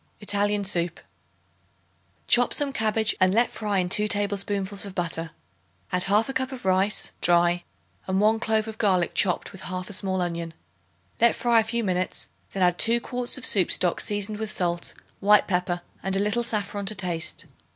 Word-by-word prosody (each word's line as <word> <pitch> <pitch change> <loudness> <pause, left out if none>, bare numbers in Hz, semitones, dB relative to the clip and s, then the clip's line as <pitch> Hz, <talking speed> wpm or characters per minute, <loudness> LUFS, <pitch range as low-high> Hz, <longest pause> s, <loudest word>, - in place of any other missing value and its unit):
Italian 205 0 0
Soup. 175 -3 +1 1.3
Chop 245 0 +3
some 285 -2 -1
cabbage 220 -2 +1
and 185 +1 +3
let 235 +2 +3
fry 210 -2 -2
in 180 -1 +1
2 210 +4 +1
tablespoonfuls 200 -1 -1
of 200 -2 -7
butter; 165 -2 -3 0.6
add 180 0 +1
1/2 210 +7 +1
cup 260 0 -2
of 255 -6 -9
rice 190 +2 +1
(dry) 175 0 +3 0.4
and 190 0 0
1 215 +2 +3
clove 220 -1 0
of 220 0 -8
garlic 185 -5 +1
chopped 180 -4 0
with 190 - -11
1/2 185 +2 -5
small 190 -1 0
onion. 170 -2 -4 0.6
Let 235 0 +4
fry 235 -1 +3
a - - +2
few 230 +1 -2
minutes; 185 -2 -2 0.2
then 195 - -1
add 180 0 +2
2 230 +1 +4
quarts 250 +2 -1
of 265 - +3
soup 190 -5 +4
stock 175 -2 +3
seasoned 205 0 -1
with 220 -1 -3
salt, 175 -4 -2 0.2
white 210 0 +5
pepper 180 -1 -1 0.2
and 195 0 -2
a - - +1
little 210 +4 0
saffron 205 -3 -3
to 215 - -2
taste. 175 -4 -2
200 Hz, 175 wpm, -25 LUFS, 180-220 Hz, 1.3 s, white